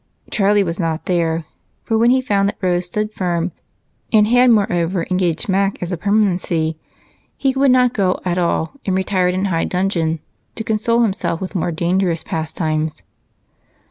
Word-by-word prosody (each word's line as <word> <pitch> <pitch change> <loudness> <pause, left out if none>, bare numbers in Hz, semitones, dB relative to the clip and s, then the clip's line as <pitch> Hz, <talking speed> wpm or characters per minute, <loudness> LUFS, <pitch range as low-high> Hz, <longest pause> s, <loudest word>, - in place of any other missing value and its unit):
Charlie 205 -1 +3
was 170 -1 -4
not 165 -2 -2
there, 165 -2 0 0.4
for 225 - -1
when 230 +2 +4
he 260 +1 +4
found 200 -5 +1
that - - -7
Rose 180 -1 0
stood 210 +4 -3
firm, 175 -2 -1 0.6
and 215 -2 +5
had 245 +3 +4
moreover 180 -5 +1
engaged 180 -3 0
Mac 195 0 +1
as 175 +1 -4
a - - 0
permanency, 175 -4 +1 0.6
he 270 -1 +1
would 270 +1 +3
not 250 -1 +4
go 190 -3 +1
at 180 0 0
all 170 -2 0
and 190 - 0
retired 185 -1 +1
in 190 +2 0
high 165 -4 0
dudgeon 175 -4 0 0.4
to 220 - -4
console 225 +2 +1
himself 195 -5 -1
with 190 - -5
more 175 -1 -1
dangerous 170 +1 0
pastimes. 155 -1 -3
185 Hz, 165 wpm, -19 LUFS, 170-210 Hz, 0.6 s, and